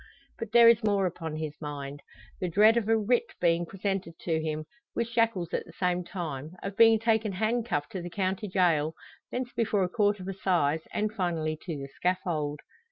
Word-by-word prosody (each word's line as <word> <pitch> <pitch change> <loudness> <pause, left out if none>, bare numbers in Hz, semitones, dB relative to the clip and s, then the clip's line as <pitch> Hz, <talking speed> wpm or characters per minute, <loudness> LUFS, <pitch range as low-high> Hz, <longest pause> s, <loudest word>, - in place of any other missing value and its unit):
But 225 -2 -5
there 235 0 +8
is 230 0 +6
more 200 -2 +2
upon 165 -3 -4
his 155 -1 -4
mind; 145 -1 -6 0.4
the 180 - -1
dread 215 +6 +6
of 225 -2 0
a 225 - +5
writ 235 +2 0
being 170 0 +2
presented 195 -3 -3
to 160 -2 0
him, 155 -1 -3 0.3
with 235 - 0
shackles 230 -7 0
at - - 0
the 165 - -13
same 180 0 0
time 160 -3 -5
of 195 0 -4
being 225 0 +7
taken 220 -2 +1
handcuffed 215 -6 -1
to 185 - -4
the 175 - -6
county 190 +3 -2
jail 165 -5 +2 0.4
thence 250 0 -3
before 215 -4 +1
a 180 - 0
court 205 0 +2
of 185 - -7
assize 175 -6 +1
and 215 0 -1
finally 165 -6 -1
to 165 -5 -3
the 140 0 -6
scaffold! 160 -5 -1
185 Hz, 190 wpm, -28 LUFS, 160-215 Hz, 0.4 s, there